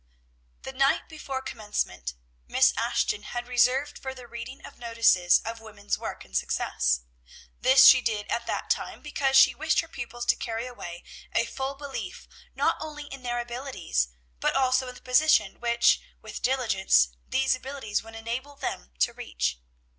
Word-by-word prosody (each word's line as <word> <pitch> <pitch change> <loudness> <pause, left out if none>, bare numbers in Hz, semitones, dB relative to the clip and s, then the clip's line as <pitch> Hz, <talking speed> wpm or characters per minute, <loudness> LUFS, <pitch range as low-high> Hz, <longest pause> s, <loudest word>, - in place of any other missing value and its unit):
The 265 - -6
night 275 +1 +2
before 275 -4 -5
commencement 205 - -3 0.3
Miss - - +4
Ashton 205 - 0
had 240 +3 -5
reserved 255 +4 +2
for 265 0 -6
the 250 -1 -11
reading 235 +2 -8
of - - -13
notices 230 -7 +4
of 230 +1 -5
woman's 210 -2 -4
work - - -7
and 65 - -14
success. 60 0 +1 0.6
This 265 +2 +7
she 260 - +9
did 215 -3 -1
at 235 0 -2
that - - -2
time, - - -2
because 275 -2 0
she - - +7
wished 315 +1 +1
her 335 - -11
pupils 240 -4 -6
to - - +4
carry 230 0 -4
away 175 -9 -8 0.3
a 230 - +2
full 265 +3 -4
belief 280 -1 -7 0.3
not - - +2
only 300 -1 -6
in 270 - -9
their 240 -1 -2
own 240 - -1
abilities, 240 - -2 0.3
but - - +1
also 260 -1 +2
in 250 - -8
the - - -14
position 250 -6 +3
which, 235 0 +3 0.2
with - - -8
diligence, 215 - +3 0.2
these 265 0 +2
abilities 255 -4 -3
would 225 0 -12
enable 240 +6 -5
them 60 - -5
to - - +3
reach. - - -3
245 Hz, 170 wpm, -27 LUFS, 220-265 Hz, 0.6 s, she